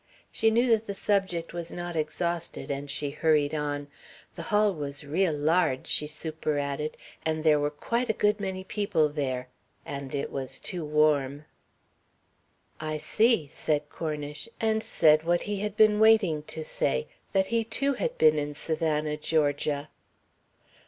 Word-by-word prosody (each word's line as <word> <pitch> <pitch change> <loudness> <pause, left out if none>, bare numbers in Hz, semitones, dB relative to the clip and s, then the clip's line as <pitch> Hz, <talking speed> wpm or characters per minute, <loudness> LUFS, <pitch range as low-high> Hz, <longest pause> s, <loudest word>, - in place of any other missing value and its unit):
She 225 - +3
knew 235 +3 +3
that 225 -1 +2
the 200 - -4
subject 190 -6 0
was 170 -1 -5
not 175 -1 -5
exhausted 165 +1 -2
and 140 +1 -4
she 145 0 -2
hurried 150 -1 +2
on. 145 -1 -2 0.5
"The - - -7
hall 210 -1 +3
was 145 -3 -5
real 165 +5 +1
large," 150 -2 +2
she 150 - +1
superadded, 150 -1 -3 0.3
"and 160 -1 -1
there 155 -2 +5
were 145 0 +1
quite 235 +11 -2
a - - +3
good 210 0 +2
many 190 -1 -3
people 190 -6 +1
there. 130 -4 -2 0.4
And 140 0 -5
it 140 - -3
was 135 -2 -3
too 175 -3 -5
warm." 150 -2 +2 1.3
"I 155 0 -3
see," 215 +4 +2
said 150 +1 -2
Cornish, 150 +2 -5
and 220 -1 +1
said 155 -6 +4
what 175 +2 +1
he 205 -1 -3
had 210 0 -3
been 215 -1 +5
waiting 215 -8 +5
to 160 - -3
say: 65 - -1 0.3
That 190 -1 +3
he 230 -1 +3
too 275 +5 0
had - - -2
been 155 -1 +5
in 145 0 -4
Savannah, 155 -1 -1
Georgia. 145 -1 0
155 Hz, 155 wpm, -28 LUFS, 150-195 Hz, 1.3 s, there